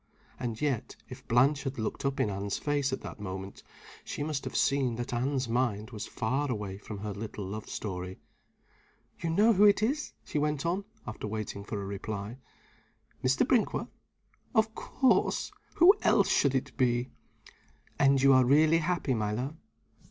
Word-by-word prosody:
And 115 -3 -3
yet, 140 -6 -1
if - - -11
Blanche 135 +4 +4
had 135 -1 -4
looked 110 +4 -3
up 135 0 -1
in 105 - +1
Anne's 100 0 -2
face 145 -2 0
at 130 - -3
that - - -8
moment, 95 -1 -6 0.4
she - - -4
must 150 -2 -2
have - - -5
seen 135 -4 +2
that 120 +1 -4
Anne's 130 +1 0
mind 115 -2 -1
was 110 -1 -6
far 135 +6 -1
away 105 -5 -4
from 105 0 -7
her 105 +1 -4
little 105 0 -6
love 105 +3 -6
story. 90 -2 -5 1.0
"You 170 - -2
know 210 +8 +5
who 200 +1 +4
it 205 +1 +5
is?" 280 +7 -1
she 150 - -2
went 150 -1 -1
on, 185 +4 -1 0.2
after 110 -1 -5
waiting 105 -1 -4
for 105 0 -4
a 100 - -4
reply. 100 +3 -5 0.8
"Mr. 130 - +3
Brinkworth?" 240 -5 +1 0.7
"Of 220 0 +3
course! 260 +3 +1 0.2
Who 350 +4 +8
else - - +4
should 140 -2 +3
it 130 - -2
be?" 120 0 +1 0.9
"And 135 -1 +5
you 135 0 +7
are 130 0 +6
really 155 +5 +5
happy, 165 -4 0
my 105 -3 -1
love?" 130 +7 -3
130 Hz, 170 wpm, -30 LUFS, 105-145 Hz, 1.0 s, Who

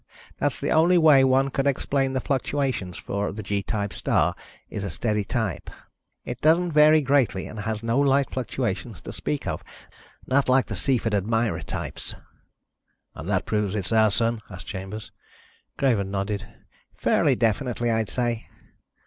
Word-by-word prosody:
That's - - 0
the - - -1
only 170 +3 +5
way 150 -5 +6
one 135 +1 +3
could 135 +2 0
explain 135 0 0
the 130 - 0
fluctuations 130 -8 -1
for 100 +1 -3
the 110 +2 -6
G 100 +1 -1
type 100 0 -3
star - - +1 0.3
is 100 - -5
a 100 - -3
steady 105 -1 -1
type. 105 -3 -3 0.6
It - - -6
doesn't 170 +3 +3
vary 155 +1 +6
greatly 135 -8 +2
and 110 - -8
has 110 +1 -3
no 115 +3 +1
light 140 -1 +3
fluctuations 110 - -3
to - - -7
speak 75 0 -3
of. - - -3 0.6
Not 135 0 +2
like 130 0 +4
the - - -5
Cepheid 120 -5 0
and 100 -1 0
Mira 115 -1 0
types." - - -5 1.0
"And - - -7
that - - +1
proves 105 -2 -1
it's 100 -1 -1
our 110 -1 +5
Sun?" 115 +2 +1
asked 90 -2 -8
Chambers. 95 +3 -7 0.7
Craven 115 -8 +1
nodded. 100 +1 -3 0.5
"Fairly - - +3
definitely, 120 +1 0
I'd 110 -2 0
say." 120 -2 -2
115 Hz, 160 wpm, -25 LUFS, 105-135 Hz, 1.0 s, way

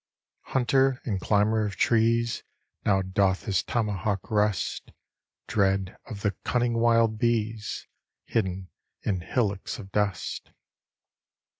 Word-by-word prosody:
Hunter 135 +1 +3
and 100 -6 -1
climber 105 +2 +2
of 100 -2 -3
trees, 115 +2 +2 0.4
Now 95 -2 +3
doth 95 0 +1
his 100 -5 +1
tomahawk 105 -4 -2
rust, 105 -2 0 0.6
(Dread 95 -2 +1
of 105 -5 -8
the 105 - +2
cunning 120 -1 +1
wild 115 -2 +3
bees), 110 -2 -1 0.4
Hidden 95 -4 -2 0.3
in 95 -3 0
hillocks 100 -1 -1
of 100 -5 -10
dust. 100 -4 -1
105 Hz, 110 wpm, -27 LUFS, 95-115 Hz, 0.6 s, Hunter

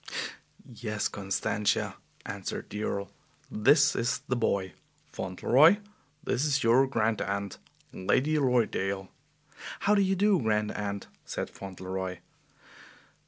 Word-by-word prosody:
"Yes, 110 -4 -3
Constantia," 100 +1 -1 0.3
answered - - -5
the 105 - -4
Earl, 100 -2 -2 0.4
"this 145 +7 +4
is 120 +1 0
the 125 - +1
boy. 100 -5 0 0.3
Fauntleroy, 140 - +4 0.5
this 130 -3 0
is 140 -2 +1
your 125 +4 +5
grand 110 -5 0
aunt, 100 0 -3 0.3
Lady 130 +11 +1
Lorridaile." 100 -7 +1 0.7
"How 205 - +3
do 205 - +4
you 195 0 +2
do, 200 -2 +3
Grand 105 -2 +1
Aunt?" 100 -1 -4 0.2
said - - -4
Fauntleroy. 95 -1 -5
110 Hz, 115 wpm, -29 LUFS, 100-135 Hz, 0.7 s, your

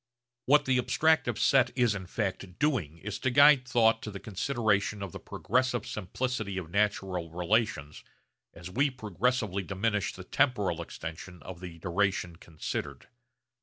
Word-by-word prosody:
What 145 +2 +5
the 130 -1 +2
abstractive 160 +5 +2
set 130 -4 +4
is 120 -4 +3
in 95 -3 -6
fact 95 -2 -4
doing 100 - 0
is 100 +4 -6
to 130 - +1
guide 140 0 +6
thought 115 -3 +3
to - - -6
the 100 -2 -7
consideration 105 -2 0
of 95 - -6
the - - -8
progressive 125 0 -1
simplicity 110 -1 -3
of 85 -3 -5
natural 95 -4 0
relations 85 -4 -1 0.5
as 85 +1 -10
we 140 +8 +2
progressively 110 -3 -1
diminish 100 +2 -1
the 90 - -10
temporal 100 - +1
extension 85 +1 -8
of 90 -2 -8
the 90 -2 -9
duration 90 0 -1
considered. 80 -2 -6
105 Hz, 145 wpm, -29 LUFS, 90-125 Hz, 0.5 s, guide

